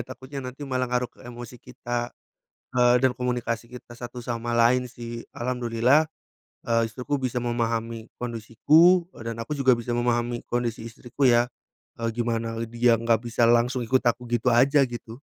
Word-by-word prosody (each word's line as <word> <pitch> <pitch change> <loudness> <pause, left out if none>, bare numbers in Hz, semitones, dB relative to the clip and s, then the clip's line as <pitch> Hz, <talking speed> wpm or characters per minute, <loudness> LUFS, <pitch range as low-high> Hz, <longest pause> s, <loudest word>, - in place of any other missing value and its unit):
takutnya 130 +2 -8
nanti 130 +2 -8
malah 130 -2 -1
ngaruh 125 0 -1
ke - - -22
emosi 120 0 -9
kita, 120 0 -4 0.6
eee, 125 0 +4
dan 130 - +5
komunikasi 120 -2 -2
kita 125 -1 -12
satu 120 0 -8
sama 120 0 -3
lain 125 +2 +3
sih, 120 -1 -8
alhamdulillah, 125 +4 +2 0.6
eee, 115 -1 +2
istriku 130 +5 -3
bisa 125 -1 -1
memahami 115 -1 -2
kondisiku, 145 +10 +3
eee, 115 0 -6
dan 115 - -5
aku 115 +6 -4
juga 130 -3 +3
bisa 120 +1 -3
memahami 120 0 0
kondisi 120 -2 -1
istriku 125 +4 -8
ya, 120 0 +4 0.5
eee, 115 - 0
gimana 115 -1 -2
dia 115 0 +3
nggak 115 -1 +1
bisa 120 0 +3
langsung 120 +1 +2
ikut 130 +2 +2
aku 120 0 0
gitu 120 +1 +1
aja, 135 +5 +5
gitu. 120 0 -8
120 Hz, 160 wpm, -25 LUFS, 115-125 Hz, 0.6 s, dan